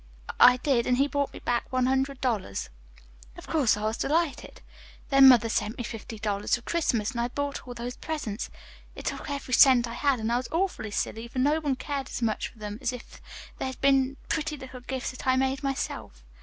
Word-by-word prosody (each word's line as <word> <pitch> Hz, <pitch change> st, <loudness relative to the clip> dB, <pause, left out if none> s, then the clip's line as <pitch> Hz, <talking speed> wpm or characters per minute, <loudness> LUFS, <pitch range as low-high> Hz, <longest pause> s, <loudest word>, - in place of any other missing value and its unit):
I 250 Hz, 0 st, +8 dB
did, 250 Hz, -2 st, +1 dB
and 250 Hz, -, +3 dB
he 275 Hz, -, +4 dB
brought 285 Hz, -1 st, -1 dB
me -, -, -10 dB
back 240 Hz, -1 st, -2 dB
one 255 Hz, -1 st, +2 dB
hundred 265 Hz, +1 st, 0 dB
dollars. 215 Hz, -, -2 dB, 0.7 s
"Of -, -, -10 dB
course, 275 Hz, -10 st, +2 dB
I 210 Hz, -, -5 dB
was 220 Hz, +1 st, -1 dB
delighted. 320 Hz, +1 st, -1 dB, 0.5 s
Then 275 Hz, -1 st, +8 dB
mother 240 Hz, -3 st, +7 dB
sent 220 Hz, 0 st, -1 dB
me 240 Hz, -, -3 dB
fifty 225 Hz, -1 st, -7 dB
dollars 205 Hz, -1 st, 0 dB
for 240 Hz, -, -9 dB
Christmas, 240 Hz, -11 st, 0 dB
and 235 Hz, -2 st, -2 dB
I 240 Hz, -, 0 dB
bought 285 Hz, +1 st, -4 dB
all 245 Hz, -, -7 dB
those 245 Hz, +2 st, -5 dB
presents. 265 Hz, -9 st, -4 dB, 0.5 s
It -, -, -9 dB
took -, -, -4 dB
every 280 Hz, -2 st, -4 dB
cent 255 Hz, -2 st, +7 dB
I 230 Hz, -, -6 dB
had, 275 Hz, 0 st, +1 dB
and 220 Hz, +1 st, -1 dB
I 240 Hz, -, +3 dB
was 255 Hz, -, -4 dB
awfully 335 Hz, -, -1 dB
silly, 225 Hz, +2 st, -3 dB
for 235 Hz, -, -10 dB
no 290 Hz, +5 st, +3 dB
one 290 Hz, -4 st, 0 dB
cared 275 Hz, 0 st, -4 dB
as -, -, -4 dB
much 220 Hz, -2 st, 0 dB
for -, -, -18 dB
them 210 Hz, 0 st, -6 dB
as -, -, 0 dB
if 250 Hz, -1 st, -10 dB, 0.4 s
they'd 260 Hz, -1 st, -4 dB
been 270 Hz, 0 st, +3 dB
pretty 305 Hz, -1 st, -2 dB
little 260 Hz, -1 st, -9 dB
gifts 255 Hz, -1 st, -4 dB
that 255 Hz, -, -9 dB
I 260 Hz, -, +4 dB
made 265 Hz, +1 st, 0 dB
myself. 265 Hz, -, -4 dB
255 Hz, 215 wpm, -27 LUFS, 235-275 Hz, 0.7 s, I